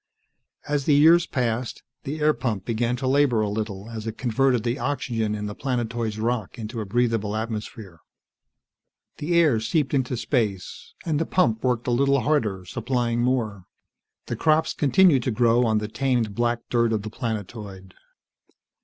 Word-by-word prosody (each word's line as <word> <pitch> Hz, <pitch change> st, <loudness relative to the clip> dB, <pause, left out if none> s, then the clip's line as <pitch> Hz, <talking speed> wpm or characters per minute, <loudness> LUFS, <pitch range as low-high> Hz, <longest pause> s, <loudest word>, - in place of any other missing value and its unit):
As 145 Hz, -2 st, -1 dB
the 150 Hz, -, +4 dB
years 165 Hz, +4 st, +6 dB
passed, 120 Hz, -2 st, -2 dB, 0.2 s
the 150 Hz, +3 st, -4 dB
air 155 Hz, 0 st, +4 dB
pump 110 Hz, -10 st, -3 dB
began 120 Hz, +1 st, 0 dB
to 130 Hz, +1 st, -3 dB
labor 135 Hz, -4 st, +3 dB
a 105 Hz, -, 0 dB
little 105 Hz, -1 st, -4 dB
as 110 Hz, -1 st, -6 dB
it 110 Hz, -, -5 dB
converted 125 Hz, -1 st, +1 dB
the 120 Hz, +3 st, -1 dB
oxygen 115 Hz, -6 st, -1 dB
in 105 Hz, 0 st, -4 dB
the 105 Hz, -, -4 dB
planetoid's 115 Hz, -3 st, -2 dB
rock 115 Hz, -1 st, -2 dB
into 110 Hz, 0 st, -5 dB
a 105 Hz, -, -6 dB
breathable 115 Hz, -1 st, 0 dB
atmosphere. 110 Hz, -5 st, -5 dB, 1.2 s
The 170 Hz, +4 st, -1 dB
air 150 Hz, -9 st, +4 dB
seeped 135 Hz, +6 st, 0 dB
into 130 Hz, -2 st, 0 dB
space, 110 Hz, -, -2 dB
and 155 Hz, -3 st, 0 dB
the 165 Hz, -, -1 dB
pump 115 Hz, -12 st, +1 dB
worked 125 Hz, -2 st, 0 dB
a 125 Hz, -, 0 dB
little 140 Hz, +2 st, +3 dB
harder, 110 Hz, -9 st, 0 dB
supplying 120 Hz, +2 st, -1 dB
more. 115 Hz, -7 st, -1 dB, 0.6 s
The -, -, -3 dB
crops 155 Hz, 0 st, +2 dB
continued 145 Hz, 0 st, +4 dB
to 125 Hz, -, -2 dB
grow 120 Hz, +1 st, +3 dB
on 110 Hz, -1 st, +2 dB
the 105 Hz, 0 st, -2 dB
tamed 120 Hz, -2 st, 0 dB
black 120 Hz, +1 st, 0 dB
dirt 115 Hz, -1 st, +2 dB
of 105 Hz, -2 st, -1 dB
the 110 Hz, -, -6 dB
planetoid. 105 Hz, -4 st, -6 dB
120 Hz, 165 wpm, -24 LUFS, 110-135 Hz, 1.2 s, years